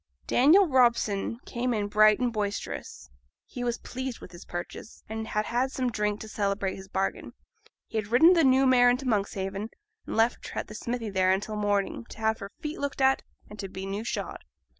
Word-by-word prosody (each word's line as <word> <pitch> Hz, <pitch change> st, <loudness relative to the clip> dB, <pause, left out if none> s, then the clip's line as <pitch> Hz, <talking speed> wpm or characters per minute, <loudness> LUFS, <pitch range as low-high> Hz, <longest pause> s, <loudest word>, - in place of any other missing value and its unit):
Daniel 320 Hz, +10 st, +5 dB
Robson 235 Hz, -6 st, +2 dB
came 245 Hz, 0 st, -1 dB
in 205 Hz, -1 st, -1 dB
bright 215 Hz, 0 st, +5 dB
and 245 Hz, -2 st, 0 dB
boisterous. 205 Hz, -, -4 dB, 0.4 s
He 245 Hz, -, -6 dB
was 240 Hz, -1 st, -1 dB
pleased 260 Hz, -1 st, -6 dB
with -, -, -12 dB
his 175 Hz, -, -12 dB
purchase, 175 Hz, +5 st, -7 dB
and 220 Hz, 0 st, -5 dB
had 210 Hz, 0 st, -1 dB
had 250 Hz, +3 st, 0 dB
some 255 Hz, -2 st, -1 dB
drink 210 Hz, -1 st, -1 dB
to 220 Hz, -, -7 dB
celebrate 200 Hz, -2 st, -1 dB
his 190 Hz, 0 st, -10 dB
bargain. 190 Hz, 0 st, -2 dB, 0.5 s
He 225 Hz, -, -2 dB
had 210 Hz, -, -4 dB
ridden 260 Hz, -, +6 dB
the 335 Hz, -2 st, +4 dB
new 265 Hz, 0 st, +5 dB
mare 250 Hz, -1 st, +6 dB
into 250 Hz, +2 st, 0 dB
Monkshaven, 200 Hz, -1 st, -1 dB, 0.4 s
and -, -, -4 dB
left 225 Hz, +2 st, +1 dB
her -, -, -4 dB
at -, -, -12 dB
the -, -, -10 dB
smithy 230 Hz, 0 st, -4 dB
there 185 Hz, -1 st, +3 dB
until 205 Hz, +3 st, -1 dB
morning, 205 Hz, +1 st, -1 dB
to -, -, -11 dB
have 220 Hz, 0 st, +1 dB
her 200 Hz, -2 st, -7 dB
feet 300 Hz, +1 st, -5 dB
looked 285 Hz, -1 st, -3 dB
at, 265 Hz, 0 st, +4 dB, 0.3 s
and 210 Hz, -, -12 dB
to 195 Hz, -1 st, -5 dB
be 190 Hz, +1 st, -6 dB
new 200 Hz, +2 st, -3 dB
shod. 235 Hz, -, -4 dB
220 Hz, 205 wpm, -27 LUFS, 200-250 Hz, 0.5 s, ridden